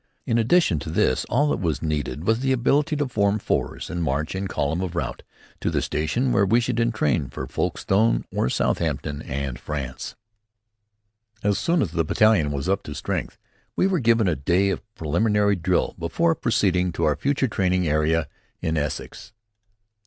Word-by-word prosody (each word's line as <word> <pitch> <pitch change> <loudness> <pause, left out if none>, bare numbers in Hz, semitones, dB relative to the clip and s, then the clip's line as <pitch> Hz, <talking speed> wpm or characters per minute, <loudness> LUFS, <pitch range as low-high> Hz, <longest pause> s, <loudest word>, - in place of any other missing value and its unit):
In 115 - +1
addition 115 - +3
to 80 - -6
this, 65 -5 +1
all 145 +4 +2
that - - 0
was 80 -6 -1
needed 75 -2 -2
was 110 +2 +2
the 130 +1 0
ability 145 +5 +2
to 145 -1 0
form 100 -4 +1
fours - - -2
and 90 -1 -4
march, 75 0 -1
in 95 +1 -3
column 80 0 -1
of 90 -2 -4
route, - - -3 0.4
to - - -1
the - - 0
station 120 - -1
where 100 - +3
we 110 +5 +4
should 120 0 -1
entrain 95 - +1
for - - -5
Folkestone 110 +4 +1
or - - 0
Southampton, 75 +2 -1
and 70 -1 -4
France. 70 -4 -5 1.3
As 100 -1 +1
soon 170 -2 +2
as 85 - -3
the 85 -1 +1
battalion 90 -2 +3
was 70 +3 -3
up 100 +1 +1
to 75 - -6
strength, - - -3 0.4
we - - +2
were 190 -3 +2
given 115 -4 +3
a 85 - +2
day 90 +8 +2
of - - -3
preliminary 105 +6 +2
drill 85 - 0
before 165 - +1
proceeding 95 - +1
to - - -2
our 75 - +3
future 140 -1 0
training 90 -5 +1
area 75 +1 +1 0.3
in 80 0 -1
Essex. 75 +7 -4
95 Hz, 175 wpm, -24 LUFS, 75-115 Hz, 1.3 s, we